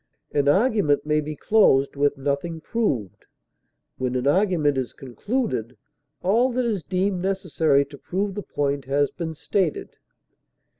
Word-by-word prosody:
An 140 Hz, -1 st, +1 dB
argument 195 Hz, -, +3 dB
may 150 Hz, 0 st, +2 dB
be 150 Hz, +1 st, -5 dB
closed 140 Hz, -8 st, +3 dB
with 145 Hz, 0 st, +1 dB
nothing 145 Hz, +4 st, -2 dB
proved; 145 Hz, -, -2 dB, 0.7 s
when 130 Hz, -1 st, -1 dB
an 125 Hz, 0 st, -1 dB
argument 160 Hz, -2 st, +2 dB
is 130 Hz, -2 st, -3 dB
concluded 135 Hz, -, -3 dB, 0.5 s
all 235 Hz, +7 st, +3 dB
that 250 Hz, 0 st, 0 dB
is 215 Hz, -6 st, -1 dB
deemed 185 Hz, +3 st, -1 dB
necessary 160 Hz, -7 st, +1 dB
to 140 Hz, 0 st, -13 dB
prove 195 Hz, +2 st, -2 dB
the 205 Hz, -, -4 dB
point 140 Hz, -6 st, -2 dB
has 140 Hz, +1 st, +1 dB
been 160 Hz, -2 st, -5 dB
stated. 180 Hz, +1 st, -2 dB
155 Hz, 140 wpm, -24 LUFS, 140-195 Hz, 0.7 s, argument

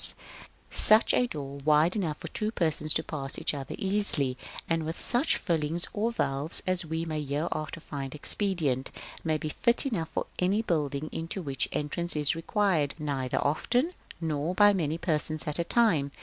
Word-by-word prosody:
Such 215 Hz, +2 st, +6 dB
a 250 Hz, -, +3 dB
door, 140 Hz, -, -6 dB
wide 155 Hz, +5 st, +4 dB
enough 165 Hz, -8 st, -2 dB
for 170 Hz, -, -7 dB
two 215 Hz, +5 st, -1 dB
persons 160 Hz, -6 st, 0 dB
to -, -, +1 dB
pass 140 Hz, -2 st, -5 dB
each -, -, 0 dB
other 140 Hz, -2 st, -5 dB
easily, 190 Hz, -10 st, +1 dB, 0.3 s
and 165 Hz, -1 st, 0 dB
with 160 Hz, +2 st, -4 dB
such 250 Hz, +6 st, +2 dB
fillings 165 Hz, -1 st, 0 dB
or 220 Hz, +3 st, 0 dB
valves 140 Hz, -7 st, -1 dB
as 185 Hz, -1 st, +3 dB
we 160 Hz, +1 st, -3 dB
may 155 Hz, -2 st, -3 dB
hereafter 155 Hz, +3 st, -3 dB
find 140 Hz, -3 st, -6 dB
expedient, 150 Hz, -6 st, +2 dB, 0.3 s
may 155 Hz, -1 st, +1 dB
be 155 Hz, 0 st, -4 dB
fit 235 Hz, -, +2 dB
enough 195 Hz, -12 st, -2 dB
for -, -, -3 dB
any 195 Hz, +5 st, +1 dB
building 150 Hz, -5 st, -1 dB
into 165 Hz, +4 st, -4 dB
which 135 Hz, -3 st, -1 dB
entrance 170 Hz, +4 st, -1 dB
is 150 Hz, 0 st, +5 dB
required 165 Hz, -4 st, 0 dB
neither 140 Hz, -5 st, -2 dB
often, 245 Hz, -, +1 dB, 0.3 s
nor 160 Hz, +1 st, -2 dB
by 205 Hz, +1 st, +6 dB
many 160 Hz, -4 st, -1 dB
persons 155 Hz, -2 st, -1 dB
at 150 Hz, +2 st, -1 dB
a -, -, +2 dB
time. 170 Hz, -9 st, +2 dB
160 Hz, 170 wpm, -28 LUFS, 150-185 Hz, 0.3 s, Such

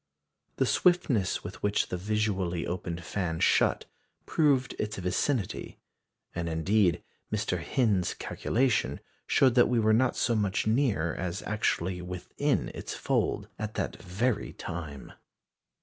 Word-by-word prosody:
The -, -, +2 dB
swiftness 150 Hz, -, +2 dB
with -, -, -8 dB
which 105 Hz, 0 st, +1 dB
the -, -, -2 dB
visually 95 Hz, -3 st, -1 dB
opened 85 Hz, -1 st, -4 dB
fan 85 Hz, -3 st, -2 dB
shut -, -, +3 dB, 0.4 s
proved 140 Hz, -5 st, +2 dB
its 105 Hz, 0 st, -2 dB
vicinity; 95 Hz, +4 st, -1 dB, 0.6 s
and, 85 Hz, 0 st, -2 dB
indeed, 90 Hz, +3 st, +2 dB, 0.3 s
Mr. 105 Hz, -5 st, -1 dB
Hind's 105 Hz, -8 st, +1 dB
calculations 125 Hz, 0 st, 0 dB, 0.3 s
showed 130 Hz, -3 st, +4 dB
that 120 Hz, -1 st, +5 dB
we 120 Hz, -1 st, +2 dB
were 110 Hz, 0 st, +4 dB
not 125 Hz, +3 st, +3 dB
so 120 Hz, -, +1 dB
much 105 Hz, -1 st, 0 dB
near 110 Hz, -, +1 dB
as 90 Hz, +1 st, -4 dB
actually 95 Hz, -4 st, -1 dB
within 90 Hz, 0 st, -1 dB
its -, -, -6 dB
folds -, -, 0 dB
at 110 Hz, 0 st, -4 dB
that -, -, -3 dB
very 105 Hz, +5 st, -1 dB
time. 80 Hz, -6 st, -7 dB
100 Hz, 130 wpm, -29 LUFS, 90-115 Hz, 0.6 s, that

